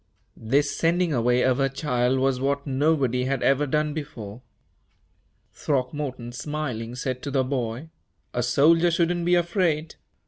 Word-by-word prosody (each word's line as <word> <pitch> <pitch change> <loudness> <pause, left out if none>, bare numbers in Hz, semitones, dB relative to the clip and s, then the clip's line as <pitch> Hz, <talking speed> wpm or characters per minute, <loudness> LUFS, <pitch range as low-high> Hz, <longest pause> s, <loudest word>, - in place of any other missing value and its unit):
This 140 +6 0
sending 170 0 +1
away 125 0 +2
of 130 0 +2
her 135 0 +2
child 130 -2 0
was 130 -1 +1
what 140 +1 -1
nobody 135 -3 +1
had 135 +1 -1
ever 140 +2 +2
done 150 +1 0
before. 125 -8 -7 1.1
Throckmorton, 130 -3 -3
smiling, 125 -3 -4
said 130 0 -3
to 145 - -5
the 135 -1 +1
boy, 130 +2 -3 0.4
"A 120 - 0
soldier 155 +8 +4
shouldn't 170 +1 0
be 175 0 +4
afraid." 170 -3 0
135 Hz, 140 wpm, -25 LUFS, 125-155 Hz, 1.1 s, soldier